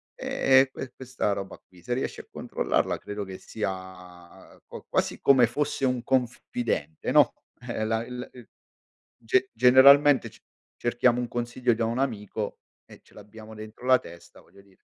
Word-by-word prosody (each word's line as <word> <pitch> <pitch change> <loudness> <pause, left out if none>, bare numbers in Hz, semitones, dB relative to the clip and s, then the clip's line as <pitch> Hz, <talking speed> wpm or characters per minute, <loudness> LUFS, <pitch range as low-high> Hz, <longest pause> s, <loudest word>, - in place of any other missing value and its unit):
Eh 130 0 +3
e 135 - -1
que 130 -2 -8
questa 125 -5 -2
roba 100 -1 -7
qui, 90 -1 -20
se 120 - -2
riesci 130 - -3
a - - -27
controllarla, - - -1
credo 105 0 -6
che 95 -1 -8
sia 95 -4 -8
qua - - -10
quasi - - -1
come 130 -3 +6
fosse 140 +1 -2
un 125 -2 -1
confidente, 120 - -2
no, - - +5 0.4
eh 110 - -2
la 110 +1 -1
il 125 0 -7
il 125 -2 -14 0.7
ge 380 0 +1
generalmente 135 0 +6
c - - -20 0.4
cerchiamo 120 0 +1
un 125 - -2
consiglio 120 +1 -1
da 115 0 -1
un 115 +3 -2
amico 110 -7 -3 0.3
e - - -16
ce - - -24
l'abbiamo 110 +1 -13
dentro 110 +3 -11
la 130 -1 +5
testa, 85 -7 -14
voglio 100 - -20
dire. 100 -1 -27
120 Hz, 165 wpm, -26 LUFS, 105-130 Hz, 0.7 s, come